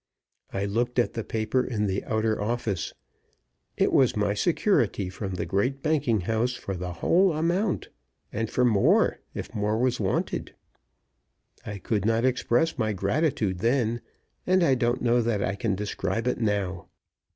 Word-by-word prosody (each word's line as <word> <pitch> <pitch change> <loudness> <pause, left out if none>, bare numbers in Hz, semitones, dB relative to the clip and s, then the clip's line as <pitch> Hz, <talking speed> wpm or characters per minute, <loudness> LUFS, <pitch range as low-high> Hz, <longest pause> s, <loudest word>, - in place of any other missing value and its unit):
I 100 +1 -2
looked 120 +5 -1
at 120 - +2
the 115 - -3
paper 115 +4 0
in 110 -5 -1
the 95 -1 -1
outer 110 -1 0
office. 110 -4 -2 0.9
It - - +2
was 130 -3 +4
my 105 -1 +1
security 115 - +1
from 95 -1 -5
the - - -2
great 125 +8 -1
banking 145 -9 +1
house 115 +6 0
for 95 - -5
the 90 0 -4
whole 175 - +3
amount, 175 +6 0 0.4
and 115 +1 -2
for 125 - +2
more, 110 -5 +3 0.2
if - - -6
more 105 0 0
was 125 +1 +1
wanted. 95 -3 -2 1.1
I 105 - -4
could 100 +1 -1
not 115 +3 +2
express 130 +4 +1
my 110 -2 +1
gratitude 100 - 0
then, 120 +1 +1 0.5
and 185 0 +4
I 140 - +4
don't 120 -1 0
know 120 0 +3
that 110 -3 0
I 95 - 0
can 100 0 -1
describe 100 +1 -2
it 125 - 0
now. 100 -4 -1
115 Hz, 160 wpm, -26 LUFS, 100-125 Hz, 1.1 s, was